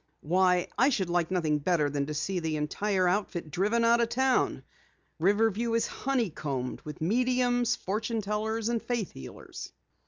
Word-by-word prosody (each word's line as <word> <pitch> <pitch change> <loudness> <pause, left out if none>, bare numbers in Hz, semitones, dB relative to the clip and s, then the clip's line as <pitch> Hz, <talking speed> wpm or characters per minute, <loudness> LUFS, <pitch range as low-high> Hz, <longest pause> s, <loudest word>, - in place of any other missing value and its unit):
Why, 180 +2 +3
I 265 - +6
should 190 -10 -1
like 175 -2 +1
nothing 160 -5 +1
better 155 -1 +2
than 140 0 -2
to 150 - -4
see 180 +5 -1
the 160 -2 -2
entire 185 +5 0
outfit 180 -4 -1
driven 210 +7 +1
out 235 +1 +5
of 230 - +1
town! 260 +1 +1 0.6
Riverview 220 +5 +2
is 230 - +2
honeycombed 155 - -2
with 150 0 -9
mediums, 245 +5 +2
fortune 220 +4 -2
tellers 215 +2 -1
and 235 -1 0
faith 235 -6 -2
healers!" 65 - -9
195 Hz, 155 wpm, -29 LUFS, 165-230 Hz, 0.6 s, I